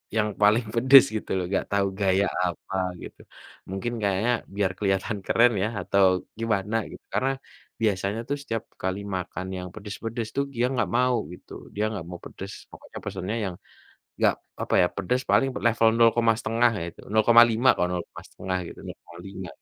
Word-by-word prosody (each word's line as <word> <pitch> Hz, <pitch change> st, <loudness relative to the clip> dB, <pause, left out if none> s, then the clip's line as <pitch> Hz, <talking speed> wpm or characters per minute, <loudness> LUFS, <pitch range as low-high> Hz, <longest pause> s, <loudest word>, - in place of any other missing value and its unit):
yang 105 Hz, -1 st, +2 dB
paling 110 Hz, +3 st, +4 dB
pedes 130 Hz, +4 st, +8 dB
gitu 110 Hz, -, -4 dB
loh, 90 Hz, -, -1 dB
nggak 95 Hz, -, 0 dB
tahu 100 Hz, -1 st, +2 dB
gaya 100 Hz, 0 st, +3 dB, 0.2 s
apa 90 Hz, +2 st, -5 dB, 0.3 s
gitu. -, -, -10 dB, 0.5 s
Mungkin 95 Hz, +5 st, -3 dB
kayaknya 100 Hz, +3 st, +1 dB, 0.2 s
biar 100 Hz, -2 st, +1 dB
kelihatan 95 Hz, 0 st, 0 dB
keren 120 Hz, +1 st, +5 dB
ya 105 Hz, -, +1 dB
atau 100 Hz, 0 st, +2 dB, 0.4 s
gimana 105 Hz, -2 st, -1 dB, 0.2 s
gitu, -, -, -12 dB
karena 135 Hz, -, +1 dB, 0.5 s
biasanya 100 Hz, 0 st, 0 dB
tuh 145 Hz, -, 0 dB
setiap 115 Hz, -5 st, -3 dB, 0.2 s
kali 95 Hz, +1 st, -1 dB, 0.2 s
makan 90 Hz, 0 st, -4 dB
yang 90 Hz, 0 st, -5 dB
pedes-pedes 110 Hz, +2 st, -5 dB
tuh 140 Hz, -, +2 dB
gia 120 Hz, +1 st, +2 dB
nggak 125 Hz, -, +1 dB
mau 125 Hz, 0 st, +3 dB, 0.2 s
gitu, 90 Hz, -, -15 dB, 0.2 s
dia 105 Hz, -, 0 dB
nggak 100 Hz, -6 st, -5 dB
mau 90 Hz, -, -6 dB
pedes 95 Hz, +1 st, -8 dB, 0.2 s
pokoknya -, -, -11 dB
pesennya 100 Hz, +5 st, -4 dB, 0.2 s
yang -, -, -10 dB, 0.6 s
nggak, -, -, +4 dB, 0.3 s
apa -, -, -1 dB
ya, -, -, +5 dB
pedes 100 Hz, +7 st, 0 dB
paling 135 Hz, -, +4 dB
pernah -, -, -6 dB
level 115 Hz, 0 st, +4 dB
0 115 Hz, 0 st, +7 dB
koma 115 Hz, -1 st, +4 dB
1/2 115 Hz, 0 st, +2 dB
ya 85 Hz, -, -3 dB
itu, -, -, -14 dB
0,5 115 Hz, +2 st, +5 dB
kok 90 Hz, -, +1 dB
0 90 Hz, -1 st, -2 dB
koma -, -, -12 dB
1/2 95 Hz, 0 st, -3 dB
gitu, -, -, -12 dB
0,5 90 Hz, +2 st, -9 dB
105 Hz, 175 wpm, -26 LUFS, 95-115 Hz, 0.6 s, pedes